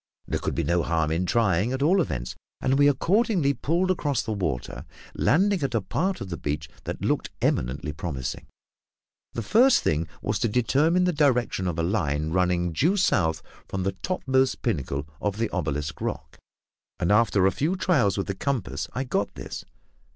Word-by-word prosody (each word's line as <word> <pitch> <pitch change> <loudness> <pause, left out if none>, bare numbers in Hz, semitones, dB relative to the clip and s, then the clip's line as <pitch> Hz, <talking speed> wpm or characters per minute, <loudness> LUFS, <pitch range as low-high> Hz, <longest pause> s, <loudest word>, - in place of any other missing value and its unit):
There - - -1
could - - -3
be 85 - 0
no 85 +3 +2
harm 80 -2 0
in 90 +3 0
trying, 105 +1 +2
at 130 +1 -1
all 185 +5 +4
events, 60 - -3 0.2
and 135 +1 +1
we 145 - +6
accordingly 175 - +2
pulled 175 +6 0
across 145 -7 0
the 110 - -4
water, 65 - -3 0.3
landing 195 +4 +2
at 135 -3 -1
a 115 - +2
part 185 - -1
of 100 - -5
the 85 - -3
beach 75 0 -3 0.2
that - - -5
looked - - 0
eminently 70 +5 -1
promising. 70 -5 -5 0.9
The 115 - -3
first 240 - +5
thing 80 +1 0
was 105 -1 -2
to - - +1
determine 140 +10 +2
the 180 0 +2
direction 125 - +1
of 85 -2 -2
a 85 - 0
line 80 -5 0
running 90 -1 +1
due 170 - +2
south 80 - +2 0.2
from 95 -1 -3
the 95 - 0
topmost 130 - 0
pinnacle 70 - -2
of 105 -1 -1
the 115 0 -1
obelisk 75 -3 -3
rock, - - -5 0.6
and 85 - +1
after 105 -3 +4
a 95 - +4
few 160 - 0
trials 135 - +2
with 100 - -1
the 100 - -2
compass, 115 -1 -2
I 130 - -1
got 120 -5 -2
this. - - -7
105 Hz, 180 wpm, -25 LUFS, -, 0.9 s, we